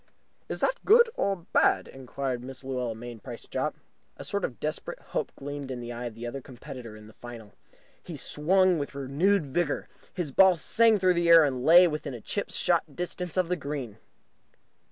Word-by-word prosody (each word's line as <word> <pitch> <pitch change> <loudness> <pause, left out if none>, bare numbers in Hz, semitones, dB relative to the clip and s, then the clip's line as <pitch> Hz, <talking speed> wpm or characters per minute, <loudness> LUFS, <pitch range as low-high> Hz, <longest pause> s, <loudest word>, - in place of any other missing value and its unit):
"Is - - -4
that - - 0
good 465 +2 +6
or 200 - 0 0.2
bad?" - - +3
inquired 130 -1 -4
Mrs. 130 +1 -8
Luella 125 -3 -3
Mainprice 120 -1 -9
Jopp. - - -2 0.4
A - - -8
sort 200 -1 -3
of 120 - -4
desperate 155 0 -4
hope - - -4
gleamed 145 0 -6
in 130 -2 -4
the 120 0 -6
eye 120 +1 -5
of 115 -2 -6
the 115 +1 -7
other 135 +3 -5
competitor 120 -3 -10
in 105 - -13
the 110 - -15
final. 115 -4 -11 0.5
He 165 -4 -8
swung 180 +5 +2
with 140 -1 -5
renewed 150 +7 +1
vigour. 145 +2 -1 0.2
His 175 -6 -3
ball 190 +5 +6
sang 225 +6 +3
through 185 -2 +3
the 170 -1 +1
air, 165 -1 +9
and 130 -4 -1
lay 175 +4 +8
within 150 -6 -4
chip - - -3
shot - - +1
distance 180 0 -4
of 185 -2 +2
the 180 - 0
green. 140 - -6
140 Hz, 185 wpm, -27 LUFS, 125-180 Hz, 0.5 s, air